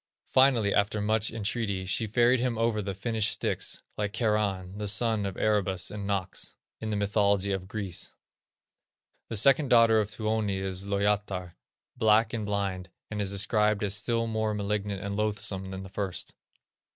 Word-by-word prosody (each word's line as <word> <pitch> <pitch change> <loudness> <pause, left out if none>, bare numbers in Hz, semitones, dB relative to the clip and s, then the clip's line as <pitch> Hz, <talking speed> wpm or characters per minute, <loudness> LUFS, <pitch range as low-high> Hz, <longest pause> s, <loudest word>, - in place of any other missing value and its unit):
Finally, 125 -6 +4
after 100 +1 +1
much 110 +1 +1
entreaty, 105 -3 -2
she 110 +4 0
ferried 120 +4 +3
him 120 -2 0
over 115 -2 +1
the 100 -1 -4
Finnish 110 +1 0
Styx, - - -2 0.2
like 105 -1 -1
Charon, 105 -4 -1
the 105 - -2
son 110 0 +2
of 95 - -6
Erebus 100 -4 0
and 100 -1 -5
Nox, 95 -2 -3 0.2
in 110 - -4
the 105 - -1
mythology 100 -1 +2
of 95 -1 -3
Greece. 100 -3 -4 1.1
The 115 - -3
second 135 +6 +4
daughter 115 -2 +6
of 105 -1 -1
Tuoni 110 -1 -1
is 95 0 -2
Lowyatar, 100 -3 -1 0.4
black 110 -1 +3
and 110 -3 -3
blind, 100 -3 -2 0.2
and 105 -1 -2
is 100 - -1
described 105 +1 +1
as 100 -1 0
still 115 +2 0
more 110 -1 -1
malignant 100 -1 -2
and 100 0 -3
loathsome 100 -2 -2
than 95 0 -6
the - - -8
first. 95 -2 -4
105 Hz, 165 wpm, -28 LUFS, 100-110 Hz, 1.1 s, daughter